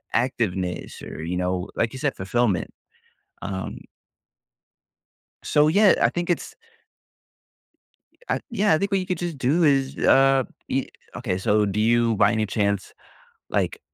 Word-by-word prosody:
activeness 110 -8 -2
or, - - -7
you 90 +2 -3
know, 90 0 -2
like 115 +1 0
you 130 - -7
said, 140 0 -1
fulfillment, 95 -2 0 0.7
um 95 -1 -5 1.7
So, 150 0 +3
yeah, 200 +5 +5
I - - +5
think 175 0 -4
it's 175 - -2 1.7
Uh, - - +1
yeah, 210 -5 +2
I - - +4
think 200 +4 -2
what 195 - +2
you 185 - -4
could 185 -1 -2
just 170 -4 -4
do 140 +7 +2
is, 135 -3 +2
uh, 135 -1 +4 0.2
ye 135 0 -2 0.3
okay, 90 - -2
so 105 +2 +2
do 100 +1 -2
you, 115 0 +3
by - - +4
any 110 -1 0
chance, 100 -1 -1 0.6
like, - - -1
120 Hz, 145 wpm, -24 LUFS, 100-150 Hz, 1.7 s, yeah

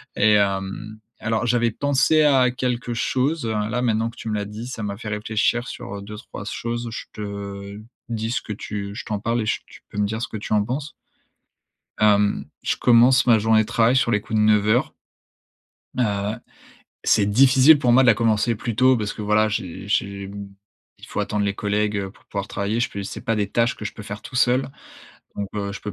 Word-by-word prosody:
et 105 +1 +4
hem, 100 +1 0 0.3
alors, 110 +1 0
j'avais 120 0 +2
pensé 145 +5 +2
à 135 -4 +4
quelque 125 -1 -2
chose, 135 +5 0
heu, 110 - -1
là, 110 +3 -1
maintenant 115 -1 +1
que 115 - -14
tu - - -8
me - - -1
l'as 105 -1 -2
dit, 105 +3 -7
ça 125 -3 -6
m'a 100 -1 -4
fait 110 0 -7
réfléchir 110 +3 0
sur, 100 - -7
heu, - - -8
2-3 105 +1 -9
s - - -5
choses, 120 0 -3
je 110 - -6
te 100 -1 -7 0.3
dis 110 -1 -2
ce 115 - -1
que 105 - -6
tu 100 0 -6
je - - -6
t'en 105 -2 -3
parle 115 +3 -1
et - - -2
j - - 0
tu - - -15
peux 105 - -5
me 105 - +2
dire 110 +2 -3
ce - - -2
que - - -6
tu 105 - -8
en 105 -1 +3
penses? 140 +5 -4 1.1
Hem, 105 -1 +3 0.2
je - - 0
commence 125 +2 +5
ma 115 -3 +6
journée 110 +1 +3
de - - -7
travail 115 +3 +3
sur 130 -2 +2
les 105 -2 +2
coups 110 +1 -2
de 105 - +4
9:00 110 +3 +3 1.0
heu, 105 -2 0 0.7
c'est 100 - +4
difficile 130 +7 +6
pour 125 -4 +2
moi 130 +2 +6
de - - +3
la 115 - +7
commencer 115 +1 +1
plus 115 +1 -4
tôt 130 +1 +5
parce 105 -2 -2
que, 110 - -7
voilà, 105 +1 +3
j'ai 95 -3 -4
j'ai, 100 -1 -1
mmh, 100 0 -8 0.5
il - - -13
faut - - -3
attendre 105 -1 -1
les 100 0 -1
collègues, 105 +1 0
heu, 95 -1 -4
pour - - -23
pouvoir 100 0 -5
travailler. 105 +3 -2
Je 120 - +1
peux 100 - -5
c'est 100 - -6
pas 115 - -1
des 105 -1 0
tâches 115 0 +1
que - - -8
je - - -4
peux 105 - -10
faire 105 +1 -7
tout - - -11
seul. 125 +1 +3 0.7
Donc, 100 - -2
heu, 100 -1 -3
je 100 - -7
peux 105 - -5
110 Hz, 225 wpm, -22 LUFS, 105-120 Hz, 1.1 s, la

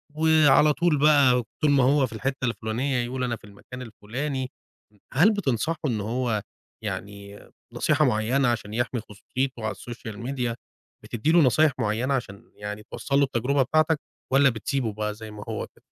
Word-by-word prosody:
وعلى 155 -2 +5
طول 170 -4 +2
بقى 140 -5 +5 0.2
طول 150 -1 +4
ما 135 -3 +4
هو 135 0 +4
في - - -12
الحتة 130 +3 -2
الفلانية 120 +4 -1
يقول: 125 +1 -3
"أنا 120 -2 -1
في - - -18
المكان 125 +5 -11
الفلاني." 125 +4 -4 0.6
هل 170 - +5
بتنصحه 160 - -1
إن 115 -6 0
هو 115 0 -1 0.4
يعني 100 0 -6 0.3
نصيحة 155 0 +2
معينة 125 +3 +2
عشان 110 -3 -1
يحمي 120 0 -1
خصوصيته 120 +5 -4
على 110 - -2
الSocial 115 -3 -8
Media، 120 +1 -2 0.5
بتدي 120 +7 -1
له 175 - +6
نصايح 150 +2 +4
معينة 115 +4 0
عشان 110 -7 -5
يعني 105 +1 -6
توصّل 140 - -1
له 140 - +5
التجربة 135 +1 +1
بتاعتَك، 155 +3 +2 0.3
والّا 135 0 +6
بتسيبه 115 0 -2
بقى 105 0 -2
زي 110 0 -10
ما 105 -1 -8
هو 110 - -3
كده؟ - - -25
125 Hz, 165 wpm, -25 LUFS, 110-140 Hz, 0.6 s, له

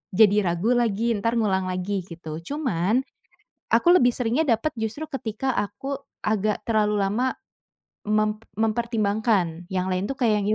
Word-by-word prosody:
jadi 210 -1 +6
ragu 175 +7 +1
lagi, 235 -1 +1
entar 230 +3 0
ngulang 195 -5 +1
lagi 185 +1 -2
gitu. 160 -3 -7
Cuman, 220 - 0 0.7
aku - - +3
lebih 250 -8 +5
seringnya 250 +5 +1
dapat 230 +6 +2
justru 225 +8 -3
ketika 260 -1 -2
aku 205 +7 -3 0.3
agak 215 -1 0
terlalu 210 -2 +2
lama 215 +6 0 0.8
mem 215 0 +1 0.2
mempertimbangkan, 215 -6 0
yang 185 -1 -1
lain 185 +2 -1
tuh 275 - -3
kayak 215 -5 +2
yang, 200 - -2
215 Hz, 140 wpm, -24 LUFS, 195-235 Hz, 0.8 s, jadi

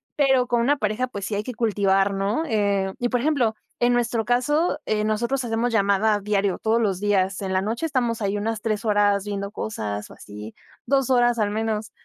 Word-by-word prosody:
pero 265 -3 +3
con 240 -1 +1
una 285 +5 +2
pareja, 215 +1 -1
pues 200 -6 -6
sí 210 - -3
hay 205 - -2
que 250 - -6
cultivar, 200 -4 +2
¿no? 200 +9 0
Eh 200 -4 +1
y 245 - -1
por 245 - +1
ejemplo, 265 -6 +1 0.3
en 240 0 +3
nuestro 235 -2 0
caso, 295 +6 +1
eh, 210 -1 0
nosotros 235 +5 0
hacemos 230 +1 0
llamada 205 0 +2
diario 200 -2 0
todos 225 +1 +1
los 195 -5 0
días, 195 -2 +1
en 190 -1 -2
la 185 - +2
noche 225 +9 -2
estamos 245 -7 0
ahí 200 0 0
unas 215 +1 -2
3 215 0 -2
horas 205 -2 +2
viendo 200 -1 -4
cosas 105 - -4
o - - -12
así, 105 +1 -10 0.3
2 270 -2 +2
horas 240 -1 +3
al 210 -2 0
menos, 220 0 -2
215 Hz, 205 wpm, -23 LUFS, 200-240 Hz, 0.3 s, pero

